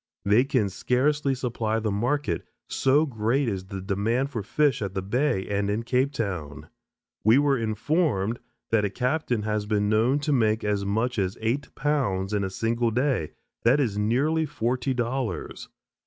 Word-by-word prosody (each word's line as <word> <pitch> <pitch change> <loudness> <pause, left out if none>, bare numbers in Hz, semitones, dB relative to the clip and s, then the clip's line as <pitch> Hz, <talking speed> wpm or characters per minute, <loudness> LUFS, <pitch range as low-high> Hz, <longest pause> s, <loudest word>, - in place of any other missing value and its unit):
They 105 +6 +4
can 130 -6 +1
scarcely 135 - +1
supply 115 -3 -1
the 110 -1 -1
market, 115 - -1 0.2
so 140 +4 +3
great 120 +1 0
is 95 -4 -3
the 95 0 -6
demand 110 +8 -1
for 115 -6 -3
fish 145 +5 +1
at 100 -2 -4
the 95 - -2
Bay 120 -1 0
and 100 0 -1
in 105 +3 -1
Cape 130 +3 +1
Town. 90 - -4 0.5
We 110 +4 +6
were 145 -1 +3
informed 115 - 0 0.3
that 110 -2 +3
a 105 - +1
captain 125 0 -1
has 105 -1 -1
been 105 -1 +1
known 115 +6 +3
to 145 0 0
make 110 -3 +2
as 105 -1 0
much 110 +4 0
as 95 0 -1
eight 115 +6 -2
pounds 130 -10 0
in 105 -1 +1
a 95 - -1
single 115 +4 0
day; 125 - 0 0.3
that 125 +5 +4
is 115 -8 0
nearly 145 +9 +1
forty 125 +2 -1
dollars. 120 0 -3
115 Hz, 170 wpm, -26 LUFS, 105-135 Hz, 0.5 s, We